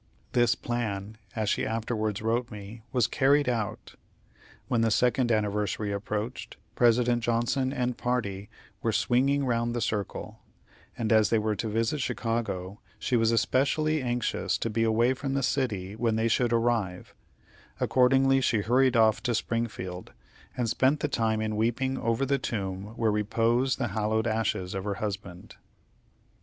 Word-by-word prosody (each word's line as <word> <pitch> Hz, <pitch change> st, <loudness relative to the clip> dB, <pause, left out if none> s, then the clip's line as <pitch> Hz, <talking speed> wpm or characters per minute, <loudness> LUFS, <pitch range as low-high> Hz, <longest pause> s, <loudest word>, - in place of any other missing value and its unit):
This 120 Hz, -1 st, +3 dB
plan, 110 Hz, -3 st, -4 dB, 0.2 s
as 110 Hz, -1 st, -1 dB
she -, -, +1 dB
afterwards 110 Hz, -2 st, -2 dB
wrote 120 Hz, +2 st, 0 dB
me, 105 Hz, +1 st, -9 dB
was 125 Hz, -3 st, +2 dB
carried 140 Hz, +3 st, +3 dB
out. 115 Hz, -5 st, -3 dB, 0.7 s
When 115 Hz, -, +1 dB
the 115 Hz, -, +3 dB
second 125 Hz, +2 st, +2 dB
anniversary 105 Hz, -1 st, 0 dB
approached, 105 Hz, +3 st, -4 dB, 0.2 s
President 120 Hz, 0 st, +3 dB
Johnson 120 Hz, +3 st, 0 dB
and 125 Hz, -3 st, -1 dB
party 105 Hz, -5 st, -2 dB, 0.3 s
were -, -, 0 dB
"swinging 135 Hz, +3 st, +2 dB
round 120 Hz, -1 st, 0 dB
the -, -, 0 dB
circle," 105 Hz, -4 st, -3 dB, 0.6 s
and 115 Hz, -2 st, +1 dB
as 110 Hz, -1 st, +4 dB
they 115 Hz, -, +3 dB
were 110 Hz, 0 st, 0 dB
to 110 Hz, -, -2 dB
visit 115 Hz, +7 st, 0 dB
Chicago, 115 Hz, -6 st, -2 dB, 0.2 s
she 125 Hz, -, -1 dB
was 115 Hz, -1 st, +3 dB
especially 145 Hz, +7 st, +1 dB
anxious 120 Hz, -1 st, -1 dB
to 115 Hz, -, -3 dB
be 115 Hz, +2 st, 0 dB
away 115 Hz, +3 st, +3 dB
from 135 Hz, +1 st, -3 dB
the 135 Hz, -, 0 dB
city 105 Hz, -8 st, -1 dB
when 115 Hz, 0 st, 0 dB
they 110 Hz, +1 st, +1 dB
should 120 Hz, +1 st, +2 dB
arrive; 115 Hz, -6 st, 0 dB, 0.7 s
accordingly 135 Hz, +1 st, +4 dB
she 115 Hz, -4 st, +2 dB
hurried 125 Hz, +3 st, +3 dB
off 110 Hz, -1 st, +4 dB
to 120 Hz, -, 0 dB
Springfield, 110 Hz, -6 st, -3 dB, 0.4 s
and 120 Hz, -2 st, 0 dB
spent 135 Hz, +6 st, +2 dB
the -, -, +1 dB
time 110 Hz, -5 st, 0 dB
in 110 Hz, -1 st, -2 dB
weeping 120 Hz, +4 st, 0 dB
over 115 Hz, +4 st, 0 dB
the 140 Hz, 0 st, +1 dB
tomb 100 Hz, -2 st, -4 dB
where 110 Hz, -2 st, +2 dB
repose 115 Hz, +5 st, +1 dB
the 120 Hz, -3 st, -2 dB
hallowed 110 Hz, +2 st, 0 dB
ashes 110 Hz, -4 st, -1 dB
of 95 Hz, -1 st, -3 dB
her 100 Hz, -1 st, -2 dB
husband. 100 Hz, -4 st, -6 dB
115 Hz, 155 wpm, -28 LUFS, 105-125 Hz, 0.7 s, as